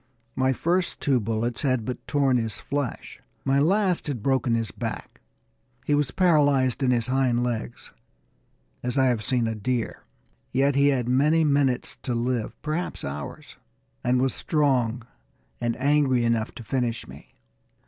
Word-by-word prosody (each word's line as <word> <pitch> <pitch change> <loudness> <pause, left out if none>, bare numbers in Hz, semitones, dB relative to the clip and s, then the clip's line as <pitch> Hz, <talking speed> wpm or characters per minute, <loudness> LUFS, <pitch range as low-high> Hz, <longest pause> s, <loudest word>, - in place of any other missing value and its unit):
My 130 0 +2
first 175 +7 0
two 135 -3 +2
bullets 115 +2 -2
had 130 -5 0
but 125 - -6
torn 135 -3 +2
his 115 -3 -2
flesh. 140 -3 -4 0.3
My 135 0 +3
last 185 +3 +2
had 125 -8 -4
broken 130 -3 +2
his 115 -4 -2
back. - - -6 0.6
He 145 - +1
was 145 -2 +2
paralyzed 145 -6 +3
in 130 - +2
his 120 -3 +2
hind 125 -2 +1
legs, 120 -1 -4 0.9
as 125 +2 -3
I 135 - +4
have 120 -4 +1
seen 125 -1 +1
a 115 - -1
deer, 115 +2 -2 0.5
yet 135 +2 +2
he 140 +1 +4
had 130 -4 +1
many 150 +6 +3
minutes 140 -4 +1
to 125 - -3
live, 120 -1 -2
perhaps 155 +3 -3
hours, 70 +1 -7 0.5
and 125 +1 +2
was 130 -1 +1
strong 130 -6 0 0.5
and 120 -1 -1
angry 135 -3 +3
enough 115 -1 0
to 120 - -9
finish 120 0 -2
me. - - -14
130 Hz, 155 wpm, -25 LUFS, 120-140 Hz, 0.9 s, I